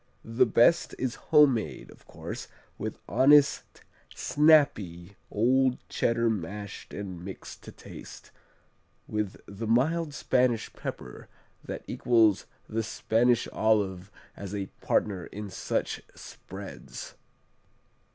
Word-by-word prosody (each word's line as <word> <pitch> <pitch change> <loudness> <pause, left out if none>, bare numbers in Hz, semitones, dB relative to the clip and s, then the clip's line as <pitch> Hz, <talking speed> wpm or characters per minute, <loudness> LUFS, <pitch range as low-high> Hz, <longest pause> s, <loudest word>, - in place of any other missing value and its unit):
The 115 +3 +3
best 120 +9 +4
is 130 -1 -1 0.2
homemade, 130 - +3
of - - -19
course, - - -7 0.3
with - - -4
honest, 145 +2 +4 0.3
snappy 105 - +3
old 125 +4 +2
Cheddar 115 0 +1
mashed 100 -1 -4
and 95 -4 -6
mixed 95 0 -9
to - - -9
taste, - - -12 0.8
with 105 -2 -3
the 100 +3 -6
mild 145 +6 +1
Spanish 125 -5 +1
pepper 65 -2 -7 0.4
that - - -6
equals 115 -5 +3 0.2
the 115 +1 -1
Spanish 115 +2 +1
olive 100 -4 +1 0.3
as 100 0 -6
a 100 -2 -4
partner 95 -5 0
in 105 -1 -7
such - - -2
spreads. - - -9
110 Hz, 105 wpm, -28 LUFS, 100-125 Hz, 0.8 s, best